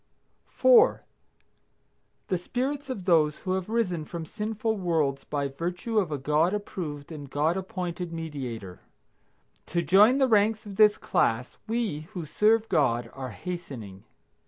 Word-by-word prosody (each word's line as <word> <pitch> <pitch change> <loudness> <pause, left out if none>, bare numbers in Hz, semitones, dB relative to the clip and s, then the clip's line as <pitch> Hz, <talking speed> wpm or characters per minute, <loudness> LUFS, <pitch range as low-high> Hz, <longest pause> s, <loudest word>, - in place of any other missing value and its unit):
4. - - +5 1.3
The 185 - +1
spirits 270 +8 -3
of 205 -8 -5
those 155 -4 +3
who 185 - -3
have 190 +1 -3
risen 195 -8 0
from 165 +1 -6
sinful 220 +3 -2
worlds 155 -7 0
by 145 -1 -2
virtue 175 - -2
of 180 -6 -1
a 145 - -1
God 150 +7 +2
approved 160 -8 -6
and 145 -3 -8
God 150 +5 +1
appointed 180 -2 -4
Mediator. 130 - -6 0.9
To 170 -1 -1
join 205 - +6
the 270 -1 +4
ranks 215 -1 +2
of 200 -2 -9
this 210 -1 +6
class 115 +3 0
we, 215 -10 -2
who 175 -5 -5
serve 215 +7 +2
God, 120 - +1
are 130 -1 -6
hastening. 115 - -7
175 Hz, 140 wpm, -27 LUFS, 145-210 Hz, 1.3 s, join